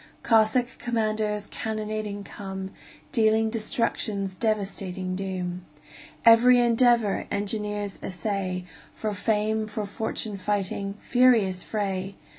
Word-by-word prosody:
Cossack 230 +2 +3
commanders 215 -3 -1
cannonading 215 -2 -4
come, 190 -1 -7 0.4
Dealing 220 -3 +3
destruction's 215 -3 -1
devastating 195 -4 -2
doom. 185 -2 -4 0.6
Every 240 +2 +8
endeavor 235 -3 +3
engineers 205 -1 -2
essay, 185 0 -3 0.3
For 215 -1 -2
fame, 215 +1 0
for 215 0 -4
fortune 210 0 -3
fighting 200 0 -2
furious 230 -7 +3
fray! 195 -2 -3
210 Hz, 90 wpm, -26 LUFS, 195-220 Hz, 0.6 s, Every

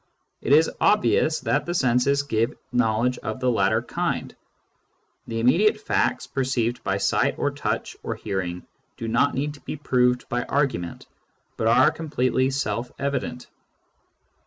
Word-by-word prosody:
It - - -2
is 155 +3 +5
obvious 185 -6 +3
that 145 +2 0
the 175 - -2
senses 130 0 +2
give 115 -4 0 0.2
know 115 -3 +2
ledge 125 +1 0
of 110 - -5
the 130 -1 +2
latter 110 +1 +2
kind: - - -3 0.9
the 115 0 -3
immediate 205 - +3
facts 215 - 0
perceived 125 -3 -1
by 100 0 0
sight 100 - +1
or - - 0
touch - - -3
or - - -4
hearing 90 -2 -4 0.3
do 115 - -5
not 115 +5 +2
need 145 +3 -2
to 145 - -15
be - - -5
proved 125 -4 +1
by 120 0 -1
argument, 130 -12 -2 0.5
but 110 - -1
are 120 +7 +5
completely 130 -5 0
self 120 -3 -2
evident. 135 -3 -3
125 Hz, 150 wpm, -24 LUFS, 115-140 Hz, 0.9 s, is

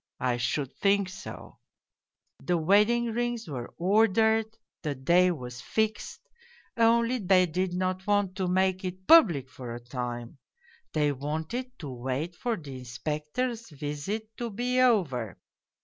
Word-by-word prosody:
I 125 -1 0
should 135 +3 -1
think 200 -1 +2
so! 190 +1 -10 0.8
The 175 -1 0
wedding 210 +8 +3
rings 240 -1 -2
were 125 -5 -6
ordered, 220 +4 +3 0.3
the 150 -4 -2
day 175 +8 +4
was 125 -7 -5
fixed, 220 0 -2 0.5
only 235 +2 +3
they 185 -2 +4
did 180 +2 -2
not 185 +1 -2
want 205 -2 +1
to 190 -2 0
make 185 +1 +1
it 185 0 -5
public 180 - +6
for 125 -2 -8
a - - -6
time 120 +1 -6 0.5
they 150 -2 +2
wanted 160 - -4
to 145 -5 -7
wait 130 +7 -3
for 235 +2 -2
the 140 -5 -8
Inspector's 150 - -3
visit 155 +10 -5
to 240 -1 -3
be 245 +4 -1
over. 160 - +2
180 Hz, 135 wpm, -28 LUFS, 140-220 Hz, 0.8 s, public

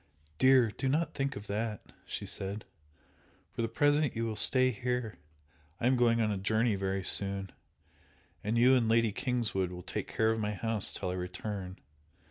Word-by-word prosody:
"Dear, 130 -4 +5
do 135 - -3
not 155 +3 0
think 140 +1 -2
of 100 - -8
that!" 105 +1 -4 0.2
she - - -5
said 100 +2 -4 0.9
"For - - -5
the 115 - 0
present 145 +4 +1
you 115 0 -1
will 110 -1 -3
stay 130 +5 +5
here 125 -1 -3 0.6
I - - -2
am 130 +1 +4
going 120 -1 +3
on 110 -2 +1
a 100 - -2
journey 110 +3 +1
very 95 0 -2
soon, 100 0 +2 0.9
and 110 +3 -1
you 125 +3 +5
and 120 -4 +2
Lady 115 -1 +3
Kingswood 110 -5 -1
will 90 0 -8
take 95 +2 -5
care 110 0 +1
of 115 - -2
my 105 -1 -2
house 110 0 +1
till 90 -2 -4
I - - -3
return. 90 +1 -5
110 Hz, 180 wpm, -30 LUFS, 100-125 Hz, 0.9 s, Dear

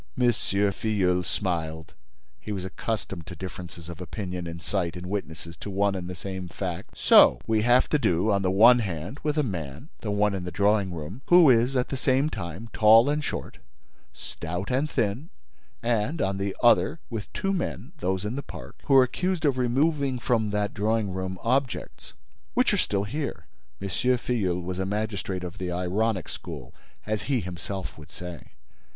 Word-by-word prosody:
M. 120 -1 +5
Filleul 100 -3 +1
smiled; 80 -2 -3 0.5
he 105 - -7
was 95 -3 -3
accustomed 95 -3 -4
to 90 - -7
differences 85 -1 -8
of 85 +1 -8
opinion 90 -2 -5
and 85 0 -6
sight 90 -2 -2
in 90 +1 -7
witnesses 85 -4 -5
to - - -7
one 100 +1 +1
and 90 -2 -4
the 90 - -5
same 95 +1 -5
fact: 85 0 -5
"So - - +7
we 110 -1 +2
have 120 +3 +4
to 150 - +2
do, 90 -2 +2
on 100 -1 +2
the 95 - +1
one 115 +6 +7
hand, 95 - -4
with 150 0 -1
a 150 - +3
man, 85 - -5
the 110 - -4
one 105 0 +2
in 95 -2 -3
the 90 - -4
drawing 100 0 +2
room, 85 - -6
who 175 -5 +8
is, 120 +3 +3
at 125 -1 +1
the 135 - -2
same 135 +3 +2
time, 85 +5 -6
tall 115 +5 +6
and 150 +1 -1
short, - - -5 0.5
stout 90 +6 -5
and 135 +4 +1
thin, 115 - -1 0.5
and, 120 +6 0
on 95 -6 0
the 100 0 -2
other, 145 +6 +4
with 110 -3 -5
two 195 -1 -1
men, 150 - -3
those 95 -3 -1
in 110 +4 -2
the 140 - -2
park, - - -10
who 140 - +4
are 130 - +9
accused 180 +6 -1
of 135 -3 +2
removing 135 +2 +1
from 115 -3 +1
that 105 0 -1
drawing 110 -1 0
room 95 0 -3
objects—which 60 - -2
are - - +2
still 100 -1 0
here!" 105 - -4 0.3
M. 100 - -4
Filleul 110 -4 0
was 90 +1 -4
a 95 - 0
magistrate 100 -3 -2
of 90 +2 -7
the 90 -1 -3
ironic 95 +4 0
school, - - -8 0.3
as 105 0 -1
he 135 -3 +3
himself 90 0 -6
would 75 -1 -12
say. 90 -1 -9
100 Hz, 180 wpm, -26 LUFS, 90-120 Hz, 0.5 s, are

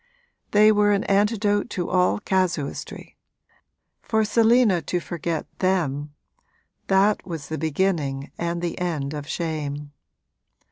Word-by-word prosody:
They 210 +1 +6
were 205 -1 +3
an 200 - +1
antidote 205 +1 +1
to 175 - -2
all 180 -1 +3
casuistry; 185 -7 -2 0.8
for 220 -1 +1
Selina 225 -4 +4
to 180 - -2
forget 170 -2 -3
them 150 -6 0 0.7
that 195 +2 +3
was 165 -5 -7
the 160 - -3
beginning 155 -4 -1
and 170 0 -3
the 170 - -3
end 155 -5 -2
of 145 -1 -6
shame. 150 -4 -4
175 Hz, 120 wpm, -24 LUFS, 155-205 Hz, 0.8 s, They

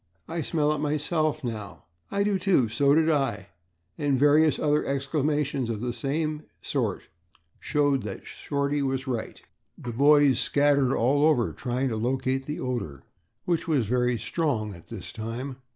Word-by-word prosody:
I 165 0 -3
smell 150 -1 +1
it 150 - -3
myself, 150 +1 0
now." 110 -6 -6 0.3
"I 200 0 0
do, 200 -2 +1
too." 180 - +2
"So 140 +5 +3
do 160 0 +3
I." 135 -8 -1 0.5
and 140 -2 +1
various 145 +3 +4
other 150 0 +1
exclamations 140 -1 -1
of 110 -3 -2
the 120 +1 -3
same 150 +5 -2 0.2
sort - - -2 0.6
showed 145 -3 +1
that 100 -2 -7
Shorty 140 0 -2
was 135 -1 -1
right. 120 -4 -4 0.4
The 120 - -6
boys 145 +1 +5
scattered 140 -2 +2
all 140 +5 +2
over 150 -7 +3
trying 130 +1 -2
to 110 - -2
locate 130 +3 -1
the 150 - -4
odor, 110 - -4 0.4
which 170 -2 0
was 145 -8 +2
very 125 +2 +1
strong 115 -9 -1
at 85 -3 -14
this - - -8
time. 120 +4 -5
140 Hz, 155 wpm, -26 LUFS, 125-150 Hz, 0.6 s, boys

